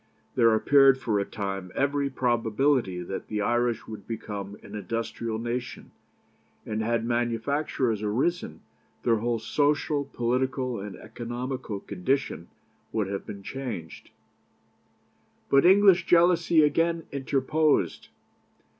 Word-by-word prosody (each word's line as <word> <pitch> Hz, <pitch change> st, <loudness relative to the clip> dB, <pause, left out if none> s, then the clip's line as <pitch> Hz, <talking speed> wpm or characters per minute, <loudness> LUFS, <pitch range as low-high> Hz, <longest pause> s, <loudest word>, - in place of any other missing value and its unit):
There 115 Hz, -3 st, +4 dB
appeared 135 Hz, +3 st, +5 dB
for 110 Hz, -6 st, 0 dB
a 100 Hz, -, -1 dB
time 95 Hz, -3 st, -5 dB
every 140 Hz, 0 st, +1 dB
probability 120 Hz, -5 st, +1 dB
that 95 Hz, -, -6 dB
the 105 Hz, -1 st, -2 dB
Irish 120 Hz, +1 st, 0 dB
would 110 Hz, -2 st, -9 dB
become 105 Hz, -3 st, -6 dB
an 100 Hz, -, -12 dB
industrial 115 Hz, +2 st, -3 dB
nation, 120 Hz, +2 st, -5 dB, 0.7 s
and, 110 Hz, 0 st, -2 dB
had 115 Hz, +1 st, 0 dB
manufactures 120 Hz, 0 st, 0 dB
arisen, 110 Hz, -, -1 dB, 0.4 s
their 115 Hz, -2 st, +3 dB
whole 120 Hz, +2 st, 0 dB
social, 145 Hz, +5 st, 0 dB
political, 130 Hz, -1 st, -1 dB
and 100 Hz, 0 st, -7 dB
economical 120 Hz, 0 st, -5 dB
condition 100 Hz, -2 st, -2 dB, 0.4 s
would 105 Hz, -3 st, -1 dB
have 100 Hz, 0 st, -5 dB
been 100 Hz, -1 st, -8 dB
changed. 115 Hz, -11 st, -6 dB, 1.4 s
But 140 Hz, +4 st, +6 dB
English 190 Hz, -1 st, +6 dB
jealousy 170 Hz, -2 st, +5 dB
again 165 Hz, +3 st, +1 dB
interposed. 140 Hz, +3 st, 0 dB
120 Hz, 110 wpm, -27 LUFS, 105-140 Hz, 1.4 s, But